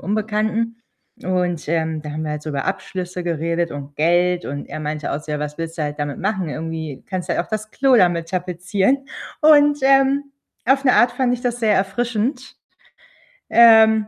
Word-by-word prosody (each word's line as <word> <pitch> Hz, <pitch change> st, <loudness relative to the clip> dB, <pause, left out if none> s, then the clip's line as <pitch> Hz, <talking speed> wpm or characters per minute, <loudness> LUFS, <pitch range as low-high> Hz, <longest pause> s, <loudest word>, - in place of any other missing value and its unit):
Unbekannten, 215 Hz, +2 st, -1 dB, 0.5 s
und, 180 Hz, -4 st, -1 dB
ähm, 160 Hz, -1 st, -1 dB
da 150 Hz, -, -6 dB
haben 155 Hz, +1 st, -4 dB
wir 155 Hz, -, -3 dB
halt 150 Hz, +1 st, -6 dB
über 140 Hz, -3 st, -3 dB
Abschlüsse 180 Hz, -2 st, -4 dB
geredet 170 Hz, 0 st, -1 dB
und 145 Hz, 0 st, -8 dB
Geld, 175 Hz, +3 st, +2 dB
und 140 Hz, +1 st, -5 dB
er -, -, -7 dB
meinte 150 Hz, 0 st, -4 dB
auch 145 Hz, -, -3 dB
so: 150 Hz, 0 st, -7 dB
„Ja, 150 Hz, -, -2 dB
was 150 Hz, 0 st, -5 dB
willst 165 Hz, 0 st, -5 dB
du -, -, -1 dB
halt 150 Hz, 0 st, -4 dB
damit 145 Hz, -1 st, -3 dB
machen? 190 Hz, -3 st, -2 dB
Irgendwie 160 Hz, -2 st, -5 dB
kannst 185 Hz, -2 st, -4 dB
du -, -, +3 dB
ja -, -, 0 dB
auch 170 Hz, -, -16 dB
das 215 Hz, 0 st, -4 dB
Klo 270 Hz, +1 st, +3 dB
damit 175 Hz, -5 st, +2 dB
tapezieren.” 185 Hz, +9 st, -1 dB, 0.3 s
Und, 295 Hz, -1 st, +5 dB
ähm, 270 Hz, +1 st, +4 dB, 0.4 s
auf 270 Hz, +2 st, +3 dB
'ne 255 Hz, -, +5 dB
Art 240 Hz, 0 st, +4 dB
fand 250 Hz, 0 st, 0 dB
ich 245 Hz, -, -6 dB
das 245 Hz, -1 st, -2 dB
sehr 220 Hz, -2 st, +3 dB
erfrischend, 230 Hz, +5 st, -2 dB, 0.9 s
ähm, 220 Hz, -1 st, +6 dB
180 Hz, 190 wpm, -20 LUFS, 160-230 Hz, 0.9 s, ähm